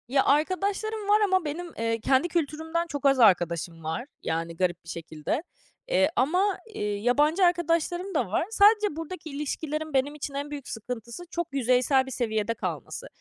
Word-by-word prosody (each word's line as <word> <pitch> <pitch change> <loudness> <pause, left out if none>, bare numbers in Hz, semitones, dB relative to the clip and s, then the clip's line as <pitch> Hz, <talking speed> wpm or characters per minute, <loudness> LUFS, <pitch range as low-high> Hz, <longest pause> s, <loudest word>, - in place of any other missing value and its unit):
Ya, 270 +2 +3
arkadaşlarım 400 +8 0
var 420 +1 +5
ama 375 -4 +2
benim, 335 +3 -5
eee, 230 0 0
kendi 265 +7 +2
kültürümden 320 +1 -1
çok 285 -3 -5
az 275 -1 +5
arkadaşım 170 -5 +3
var. 160 +9 -3 0.2
Yani, 165 +1 -2
garip 180 -1 0
bir 165 - -13
şekilde, 165 - -4 0.4
eee, 405 -13 +3
ama, 365 +9 +2 0.2
eee, - - -6
yabancı 290 - +2
arkadaşlarım 350 +2 0
da 250 -8 +1
var. 205 - 0
Sadece 420 -4 +5
buradaki 330 +1 -6
ilişkilerin 300 +1 -4
benim 275 +2 +1
için 290 -1 -5
en 285 +1 -4
büyük 285 -3 -6
sıkıntısı 235 +6 -6
çok 345 -2 -2
yüzeysel 260 +1 +3
bir 265 - -8
seviyede 220 -3 -1
kalması. - - -5
290 Hz, 165 wpm, -27 LUFS, 230-345 Hz, 0.4 s, var